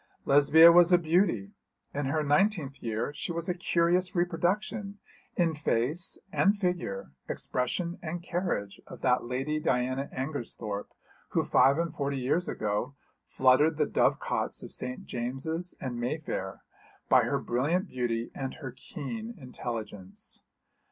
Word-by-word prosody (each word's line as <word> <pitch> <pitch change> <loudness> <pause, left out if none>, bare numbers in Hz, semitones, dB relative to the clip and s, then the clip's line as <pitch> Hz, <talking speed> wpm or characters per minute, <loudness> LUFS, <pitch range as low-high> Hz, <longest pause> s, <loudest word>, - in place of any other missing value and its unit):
Lesbia 155 +4 +8
was 175 +1 +6
a 180 - +8
beauty. 180 +4 +1 0.4
In 145 -1 -2
her 155 +3 0
nineteenth 150 -2 +1
year 115 +5 -2
she 150 - -4
was 170 0 -2
a 180 - +1
curious 175 +2 +1
reproduction 185 +4 -1 0.4
in 170 -2 +2
face 150 +4 0
and 200 +1 +3
figure, 175 - -2 0.2
expression 170 +8 -1
and 170 +1 -5
carriage, 170 - -2
of - - -11
that 125 -2 +2
Lady 135 +5 -1
Diana 130 0 0
Angersthorpe 120 -7 -4 0.4
who - - +3
five 140 +2 +4
and 170 0 -1
forty 140 -1 -2
years 140 +8 0
ago 110 +6 -2 0.3
fluttered 140 +5 +4
the - - +3
dove - - +2
cots - - -2
of - - -9
St. 125 0 -5
James's 135 +9 -3
and 125 -3 -4
Mayfair 120 -7 -3 0.4
by - - +5
her - - 0
brilliant 155 - 0
beauty 120 -4 -2
and 135 -1 -4
her 135 -5 -7
keen 220 - -7
intelligence. 115 - -5
145 Hz, 140 wpm, -29 LUFS, 125-175 Hz, 0.4 s, Lesbia